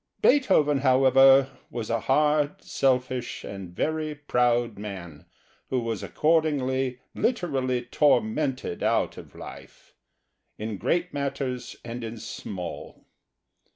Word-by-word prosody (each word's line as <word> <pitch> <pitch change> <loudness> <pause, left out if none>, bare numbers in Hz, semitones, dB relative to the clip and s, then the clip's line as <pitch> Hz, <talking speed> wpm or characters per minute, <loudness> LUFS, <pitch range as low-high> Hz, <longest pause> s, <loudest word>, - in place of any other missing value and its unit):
Beethoven 185 - +4
however, 135 0 +6 0.2
was 115 -2 -4
a 115 - +1
hard, 150 +2 +2
selfish, 125 -2 0
and 95 -2 -7
very 155 - -2
proud 120 -6 +1
man, 90 -8 -8 0.4
who 130 - +1
was 115 -4 -3
accordingly 135 -5 +1 0.2
literally 135 - 0
tormented 130 - +1
out - - +1
of - - -12
life, - - -12 0.6
in 110 -1 -4
great 175 +1 0
matters 140 -3 -3
and 120 +1 -6
in 115 +1 -6
small. 95 -4 -7
130 Hz, 105 wpm, -26 LUFS, 115-145 Hz, 0.6 s, however